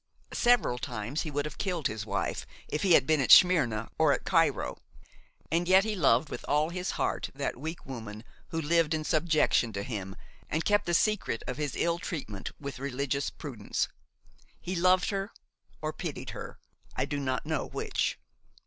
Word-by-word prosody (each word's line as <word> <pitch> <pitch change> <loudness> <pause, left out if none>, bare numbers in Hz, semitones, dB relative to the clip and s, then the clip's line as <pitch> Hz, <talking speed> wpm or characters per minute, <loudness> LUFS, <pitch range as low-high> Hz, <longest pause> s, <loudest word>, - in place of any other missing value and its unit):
Several 240 - +3
times 120 +3 -3
he 155 - -4
would 145 0 -2
have 150 - -7
killed 180 -6 -2
his 110 0 -2
wife, - - -2 0.2
if 150 - -2
he 185 -3 +4
had - - +6
been 155 -1 +3
at 130 - 0
Smyrna 130 - +6
or - - +5
at - - -3
Cairo. - - +2 0.7
And 170 +2 +1
yet 190 +1 +6
he 215 0 -1
loved 145 - +3
with - - -6
all 150 +2 +2
his 180 +2 -3
heart - - -1
that 140 0 -2
weak 160 +4 -6
woman 110 -5 -7 0.2
who 165 - -3
lived 165 0 +2
in 155 - -2
subjection 155 -7 +2
to 100 0 -3
him 100 -4 -5 0.3
and 160 +2 -1
kept 205 -1 +2
the 175 - +2
secret 210 - +1
of 125 - -4
his 145 -3 -2
ill 170 0 +1
treatment 110 - -5
with 140 -2 -6
religious 140 +1 -1
prudence. 125 -9 -3 0.7
He 185 - -4
loved 180 +3 +3
her 195 +1 -2 0.5
or - - -1
pitied - - -5
her–I - - -7
do 145 - -3
not 130 -2 -2
know - - -1
which. - - -1
150 Hz, 175 wpm, -29 LUFS, 125-175 Hz, 0.7 s, had